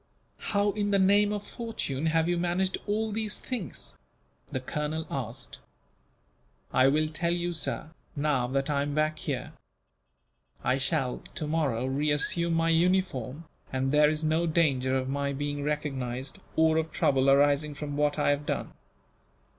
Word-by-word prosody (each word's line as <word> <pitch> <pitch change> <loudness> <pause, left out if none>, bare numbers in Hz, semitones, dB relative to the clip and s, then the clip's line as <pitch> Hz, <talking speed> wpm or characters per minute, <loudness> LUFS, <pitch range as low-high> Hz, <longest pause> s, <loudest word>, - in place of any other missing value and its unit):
"How 205 -1 +1
in 205 0 -1
the 200 - +4
name 200 +2 +4
of 205 -1 -3
fortune 160 - -3
have 160 0 +2
you 175 - +2
managed 175 +2 0
all 215 +1 0
these 215 0 0
things?" 220 - -5 0.5
the 130 - -3
colonel 150 +4 -3
asked. 125 -2 -5 1.1
"I 130 - +5
will 155 +3 +3
tell 170 +2 0
you, 175 0 -2
sir, 160 -1 -2 0.2
now 140 -4 +1
that 135 +2 -1
I 145 -2 +1
am 145 0 -2
back 155 0 +1
here. - - -3 1.1
I 130 - +2
shall 135 -3 0 0.2
tomorrow 150 -6 0
reassume 150 +5 +1
my 165 0 +2
uniform, 165 -5 +1 0.3
and 130 0 0
there 150 0 +5
is 155 +1 -1
no 160 +2 +2
danger 135 -6 +2
of 130 0 -2
my 140 +1 -1
being 145 +1 -3
recognized, 135 -3 -3 0.2
or 160 0 +4
of 160 0 -1
trouble 135 -1 +2
arising 145 +2 +3
from 145 0 -5
what 145 0 +1
I 145 - +3
have 145 +1 -2
done." - - -2
150 Hz, 155 wpm, -28 LUFS, 140-170 Hz, 1.1 s, I